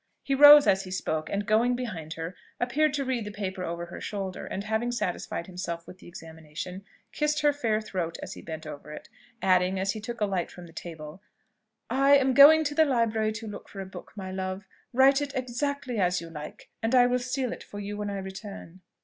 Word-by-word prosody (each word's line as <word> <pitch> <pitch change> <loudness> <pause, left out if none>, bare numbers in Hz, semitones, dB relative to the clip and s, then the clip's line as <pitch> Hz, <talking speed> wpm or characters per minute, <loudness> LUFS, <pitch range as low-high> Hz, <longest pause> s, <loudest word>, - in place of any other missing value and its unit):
He 275 - -1
rose 290 +1 +10
as 190 0 +3
he 185 - -9
spoke, 160 -4 -2
and 200 +1 -2
going 230 +4 +3
behind 180 -11 -5
her, 165 +3 -6 0.2
appeared 290 +6 +2
to 280 -1 -1
read 255 -3 -1
the 210 - -6
paper 190 -3 -4
over 170 0 -4
her 175 - -9
shoulder, 195 -3 -5
and 195 - -4
having 220 +3 -1
satisfied 180 -6 -3
himself 170 -2 -5
with 185 - -12
the - - -14
examination, 165 +2 -8 0.3
kissed 300 0 0
her 295 0 +4
fair 225 -7 0
throat 185 -6 -4
as - - -6
he - - -10
bent 160 0 -7
over 150 0 -9
it, - - -10 0.3
adding, 185 0 +3
as 195 +1 0
he 215 - -6
took 235 +2 -6
a 210 - +2
light 190 -4 -2
from 180 - -11
the 165 - -15
table, 160 +1 -8 0.7
"I 275 +3 +5
am 265 -1 +2
going 300 +4 +9
to 295 -1 -2
the 315 +2 +5
library 230 -6 +1
to 220 +1 -7
look 210 - -8
for 195 - -9
a 195 - -4
book, 190 - -11
my 190 -2 -6
love: 190 +1 -4 0.3
write 270 +3 +5
it 285 -1 -4
exactly 255 0 -2
as 180 -1 +2
you 165 -1 -9
like, 150 -1 -9
and 225 +3 +1
I 245 -1 +7
will 250 0 +2
seal 255 0 -2
it - - -9
for 205 - -9
you 205 0 -5
when 205 0 -3
I 200 - -3
return." 190 -2 -8
205 Hz, 225 wpm, -27 LUFS, 180-250 Hz, 0.7 s, rose